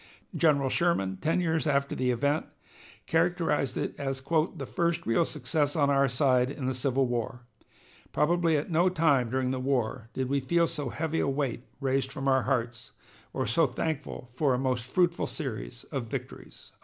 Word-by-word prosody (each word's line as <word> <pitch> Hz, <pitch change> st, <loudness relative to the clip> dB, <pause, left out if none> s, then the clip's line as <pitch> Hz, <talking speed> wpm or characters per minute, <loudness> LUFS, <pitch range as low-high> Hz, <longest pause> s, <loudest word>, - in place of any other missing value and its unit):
General 140 Hz, -5 st, +3 dB
Sherman, 115 Hz, -, +1 dB
ten 165 Hz, -, 0 dB
years 160 Hz, -2 st, 0 dB
after 140 Hz, -1 st, +1 dB
the 130 Hz, -1 st, 0 dB
event, 145 Hz, +5 st, +1 dB, 0.6 s
characterized 165 Hz, -6 st, +1 dB
it -, -, -2 dB
as 135 Hz, -1 st, -2 dB
"the 155 Hz, +4 st, -1 dB
first 170 Hz, -2 st, -1 dB
real 115 Hz, +9 st, +3 dB
success 145 Hz, 0 st, -1 dB
on 145 Hz, -3 st, +3 dB
our 140 Hz, 0 st, +4 dB
side 125 Hz, -1 st, +2 dB
in 140 Hz, -1 st, -5 dB
the 130 Hz, -, 0 dB
Civil 130 Hz, +1 st, +1 dB
War. 120 Hz, 0 st, -3 dB, 0.7 s
Probably 165 Hz, 0 st, +2 dB
at 150 Hz, +5 st, -3 dB
no 170 Hz, +3 st, +4 dB
time 145 Hz, -8 st, +2 dB
during 130 Hz, +1 st, 0 dB
the 130 Hz, -, -2 dB
war 125 Hz, -3 st, -1 dB
did 130 Hz, -1 st, -2 dB
we 140 Hz, +2 st, +1 dB
feel 170 Hz, +6 st, +2 dB
so 150 Hz, -5 st, -3 dB
heavy 160 Hz, +4 st, -2 dB
a -, -, +1 dB
weight 135 Hz, -3 st, -2 dB
raised 135 Hz, -1 st, 0 dB
from 135 Hz, 0 st, -4 dB
our 130 Hz, -1 st, +4 dB
hearts, 120 Hz, -4 st, -2 dB, 0.4 s
or -, -, -2 dB
so -, -, +3 dB
thankful 150 Hz, -5 st, -4 dB
for 135 Hz, 0 st, +2 dB
a -, -, 0 dB
most 125 Hz, -1 st, -2 dB
fruitful 175 Hz, -2 st, +2 dB
series -, -, -5 dB
of -, -, -3 dB
victories." -, -, -8 dB
140 Hz, 175 wpm, -28 LUFS, 130-160 Hz, 0.7 s, our